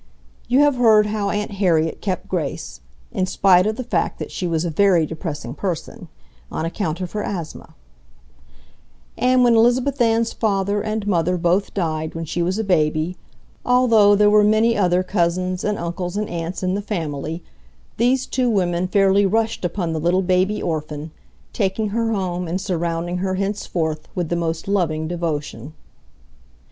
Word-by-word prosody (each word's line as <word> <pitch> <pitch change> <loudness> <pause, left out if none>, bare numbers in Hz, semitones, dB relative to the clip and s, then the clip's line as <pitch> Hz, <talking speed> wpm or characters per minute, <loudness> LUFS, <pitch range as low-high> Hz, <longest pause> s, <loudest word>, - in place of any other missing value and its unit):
You 255 +3 +4
have 290 -3 +3
heard 220 -3 +5
how 210 -1 -1
Aunt 210 +1 -2
Harriet 170 -5 +1
kept 185 -3 -3
Grace 140 - -4 0.3
(in 185 - -1
spite 185 0 +4
of 215 - -1
the 255 - -4
fact 245 - -1
that - - -6
she 180 - -3
was 165 0 -1
a 170 - -2
very 180 -1 +3
depressing 155 -6 -6
person) 180 +4 -5 0.4
on 160 - -2
account 165 0 -3
of 180 - -4
her 210 - -3
asthma; 170 -7 -6 1.4
and 255 +1 +3
when 240 -1 +5
Elizabeth 245 +4 +2
Ann's 230 0 +2
father 200 -1 0
and 215 0 -3
mother 180 -2 +1
both 175 +4 0
died 160 -4 -2
when 165 0 -4
she 175 +3 -3
was 180 +3 0
a 220 - -1
baby, 155 -2 +1 0.5
although 230 -5 +5
there 210 +1 +4
were 210 0 +6
many 220 +2 +3
other 180 -2 +2
cousins 185 0 -1
and 210 -1 -1
uncles 175 +2 -4
and 210 0 -1
aunts 170 +2 -4
in 185 0 0
the 200 - -1
family, 160 -4 -4 0.5
these 250 +3 +2
two 250 -1 0
women 180 -4 0
fairly 195 +1 +3
rushed 225 +2 0
upon 175 -1 -2
the 160 - -2
little 175 +4 +1
baby 185 +3 +1
orphan, 155 -1 -4 0.4
taking 205 +1 -1
her 225 +2 -1
home 180 -4 -2
and 175 +3 -2
surrounding 175 -1 -2
her 185 +1 -1
henceforth 180 -6 -2
with 175 -3 -2
the 175 - 0
most 165 0 -2
loving 160 -6 0
devotion. 155 -6 -4
185 Hz, 165 wpm, -21 LUFS, 170-210 Hz, 1.4 s, were